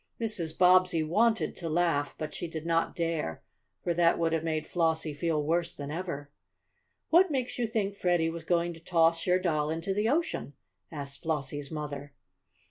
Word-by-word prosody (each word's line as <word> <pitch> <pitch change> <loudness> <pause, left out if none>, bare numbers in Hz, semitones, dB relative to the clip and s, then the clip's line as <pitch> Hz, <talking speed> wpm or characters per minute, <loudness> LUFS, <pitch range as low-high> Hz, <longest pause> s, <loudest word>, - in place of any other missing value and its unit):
Mrs. 190 -9 -3
Bobbsey 180 -2 +5
wanted 220 +8 +2
to 165 - -4
laugh, 160 -3 +1
but 155 -1 -5
she 175 - -4
did 160 -1 -6
not 165 0 +1
dare, 165 - -2 0.4
for 175 - +1
that 170 0 +3
would 165 -1 +1
have 165 -1 0
made 155 -1 -1
Flossie 160 -2 0
feel 155 0 0
worse 170 +3 0
than 145 -2 -6
ever. 150 -4 -5 0.8
"What 355 +3 +6
makes 255 -4 -2
you 235 - +1
think 210 -3 -1
Freddie 175 -4 +2
was 165 0 -7
going 170 +1 +1
to 165 - -12
toss 165 0 +2
your 180 0 +5
doll 155 -5 0
into 165 +4 -2
the 210 +3 +1
ocean?" 300 - -1 0.4
asked 140 -2 -7
Flossie's 145 -3 -3
mother. 145 -2 -6
165 Hz, 175 wpm, -29 LUFS, 155-180 Hz, 0.8 s, What